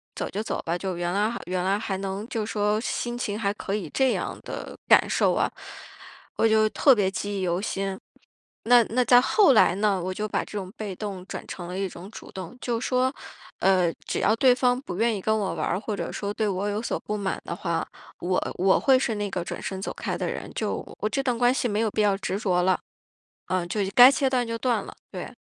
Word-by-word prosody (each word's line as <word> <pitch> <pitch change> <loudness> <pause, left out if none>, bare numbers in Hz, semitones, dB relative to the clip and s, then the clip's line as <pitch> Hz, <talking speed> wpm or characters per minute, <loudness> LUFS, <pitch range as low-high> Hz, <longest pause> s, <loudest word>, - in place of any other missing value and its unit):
走 - - -3
就 210 - -3
走 - - -3
吧， 170 +1 0
就 185 0 -3
原 175 0 -1
来 210 +3 +1 0.2
原 180 0 -1
来 195 +2 +1
还 200 -3 -3
能 195 +2 -4
就 225 -4 -2
说 210 0 0
心 240 0 -3
情 210 -4 -2
还 200 -3 +1
可 200 -1 -5
以 190 -7 -4
这 265 -1 +2
样 - - -3
的 - - -7
感 - - +6
受 - - +2
啊。 - - +1 0.9
我 225 - +4
就 220 0 +4
特 275 +5 +5
别 200 -4 +2
记 200 +1 -3
忆 - - -2
犹 180 0 0
新， 195 -1 -3 0.7
那 240 0 +7
那 250 +4 +1
到 245 0 +7
后 380 - +5
来 200 -6 +5
呢， 200 -2 +1
我 185 +1 -2
就 210 +3 -3
把 - - -1
这 210 - -7
种 190 -2 -5
被 205 -3 -5
动 195 -2 -5
转 - - -6
成 175 -2 -7
了 180 +1 -5
一 195 0 -1
种 180 +3 -10
主 - - -11
动， 190 +6 -8
就 235 -2 -1
说， 255 +1 +1 0.5
呃， 185 -3 +3
只 - - -1
要 215 - +3
对 250 0 +5
方 250 -1 +2
不 180 - -6
愿 225 +1 +2
意 200 - -5
跟 220 +3 +1
我 200 -3 -1
玩 - - -2
儿 180 - 0
或 215 0 -4
者 - - -4
说 200 0 -3
对 215 0 0
我 195 0 -1
有 205 +2 -2
所 - - -2
不 210 - -3
满 200 -2 -2
的 170 - -4
话， 170 -1 -2 0.3
我 180 +1 -1
我 190 +1 +4
会 265 -1 +5
是 235 -4 -1
那 205 -1 -2
个 180 - -2
转 - - -5
身 190 - -4
走 - - -4
开 - - -3
的 - - -2
人， - - -6
就 - - -1 0.2
我 - - 0
这 275 - 0
段 250 -3 0
关 245 +1 +4
系 260 - 0
没 210 -2 -1
有 220 - 0
必 215 - 0
要 205 -2 +3
执 195 0 -3
着 180 -4 +1
了， 185 0 +2 0.7
呃， 185 -2 0
就 205 +4 -1
该 250 +2 +10
切 280 -1 +1
断 250 -2 0
就 230 0 -3
断 230 -3 0
了。 - - -10 0.2
对。 - - -7
205 Hz, 260 characters per minute, -25 LUFS, 190-230 Hz, 0.9 s, 该